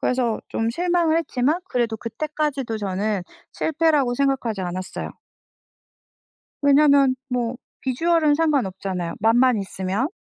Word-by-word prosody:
그래서 245 -3 0
좀 225 0 -1
실망을 340 +2 +1
했지만 305 +2 0
그래도 235 -3 0
그때까지도 275 -1 -3
저는 200 0 -1 0.3
실패라고 305 -6 +1
생각하지 250 -7 0
않았어요. 185 +1 -5 1.5
왜냐하면 280 -2 +5
뭐 245 -1 -1 0.2
비주얼은 305 +3 +2
상관없잖아요 195 - -1
맛만 240 +3 +4
있으면. 195 +5 -2
255 Hz, 305 characters per minute, -23 LUFS, 220-300 Hz, 1.5 s, 왜냐하면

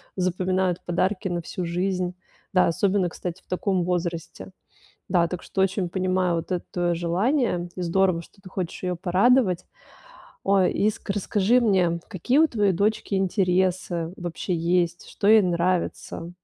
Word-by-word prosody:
запоминают 185 0 0
подарки 185 +3 0
на 175 -1 -2
всю 175 +2 -5
жизнь. 180 +1 -1 0.4
Да, 185 - +5
особенно, 185 +1 +1
кстати, 175 +2 -6
в - - -39
таком 185 -1 0
возрасте. 170 - -3 0.6
Да, 175 -2 +3
так 180 0 -5
что 190 - -1
очень 190 -1 0
понимаю 185 -1 0
вот 165 - -5
это 180 - -2
твоё 175 -1 0
желание. 180 - 0
Здорово, 180 0 +1
что 195 - -20
ты 185 - -11
хочешь 180 -3 -4
её 180 -1 -1
порадовать. 190 +2 +3 0.8
Ой, 195 -2 +3
и 210 +2 +2
с - - -10
расскажи 205 +4 +2
мне, 185 -7 +2
какие 225 - 0
у 320 - +6
твоей 210 -8 +1
дочки 200 +2 0
интересы 180 -3 0
вообще 175 +1 -3
есть? 170 0 0
Что 200 - -1
ей 220 0 +8
нравится? 175 -1 -1
185 Hz, 150 wpm, -24 LUFS, 175-195 Hz, 0.8 s, ей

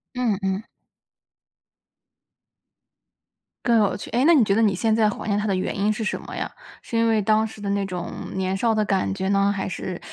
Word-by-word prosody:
嗯 235 -6 0
嗯。 190 +3 -1 3.0
更 235 -1 +4
有 200 -2 +2
趣， - - -9
诶， 245 +3 +2
那 335 +1 +7
你 260 - +6
觉 195 - +2
得 225 - +3
你 205 -4 +3
现 220 +4 +1
在 220 -1 +3
怀 - - -6
念 205 -1 +1
它 210 - -1
的 195 - +1
原 185 - -2
因 205 +2 +1
是 215 +1 -3
什 210 - -2
么 - - -8
呀？ - - -3 0.3
是 - - -6
因 230 0 +3
为 220 -1 +3
当 215 +2 +2
时 220 - -12
的 205 - -5
那 200 0 0
种 180 -2 -5 0.2
年 190 0 -1
少 225 +3 +1
的 215 -1 +1
感 195 -2 0
觉 190 -1 -2
呢， 200 0 +3
还 195 -1 -2
是 185 -1 -5
205 Hz, 230 characters per minute, -23 LUFS, 195-220 Hz, 3.0 s, 那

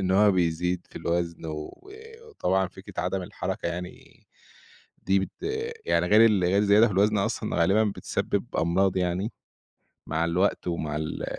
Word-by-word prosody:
إن 95 -1 -1
هو 100 +1 +5
بيزيد 90 0 0
في - - -12
الوزن، 85 -1 -2
وآآ 405 - -9
وطبعًا 95 - 0
فكرة - - -8
عدم 95 -1 -2
الحركة 90 - -4
يعني 90 +1 -8 0.8
دي 95 +1 +3
بت 95 - -4 0.5
يعني - - +2
غير 110 +2 +7
ال 105 -5 +3
غير 90 +3 +2
الزيادة 105 +2 +5
في 105 - -4
الوزن 105 +3 +3
أصلًا 100 - -1
غالبًا 95 +6 +4
بتسبب 105 -2 -2
أمراض 95 +3 +2
يعني، 90 +4 -1 0.8
مع 80 +2 0
الوقت 90 +4 0
ومع 80 -3 -2
ال 80 0 -4
95 Hz, 155 wpm, -26 LUFS, 85-105 Hz, 0.8 s, غير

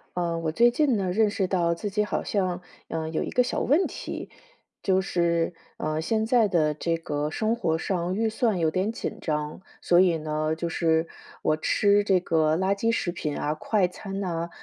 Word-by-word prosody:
嗯， 170 -1 -1
我 160 -1 -1
最 240 +7 +5
近 265 -3 +2
呢， 185 -2 -1
认 215 +3 +3
识 200 -2 -1
到 170 -3 +1
自 205 +5 -4
己 210 +1 +1
好 210 - -2
像， 185 -3 -1 0.3
嗯， 160 0 -3
有 - - 0
一 - - -4
个 250 - +3
小 - - -2
问 310 +8 +3
题。 - - -6 0.5
就 190 -1 +3
是， 170 -2 0 0.2
嗯， 155 0 -2
现 220 +6 0
在 230 -1 +4
的 155 -5 +2
这 165 +3 -1
个 150 -2 -3
生 220 +7 0
活 160 -6 0
上 180 +1 -2
预 225 +2 +1
算 220 -2 0
有 160 -2 +1
点 190 +6 0
紧 230 - -5
张。 150 -1 -3 0.2
所 175 - +4
以 180 -3 +4
呢， 155 0 -1
就 170 +1 -3
是 160 0 +1 0.3
我 155 - +1
吃 205 +5 +3
这 190 -2 +4
个 160 -2 +2
垃 190 +2 +2
圾 215 +3 0
食 190 -6 -1
品 155 -5 -4
啊、 150 - -1
快 190 +4 +1
餐 195 +2 -6
呐， 170 -3 -2
180 Hz, 215 characters per minute, -26 LUFS, 160-205 Hz, 0.5 s, 最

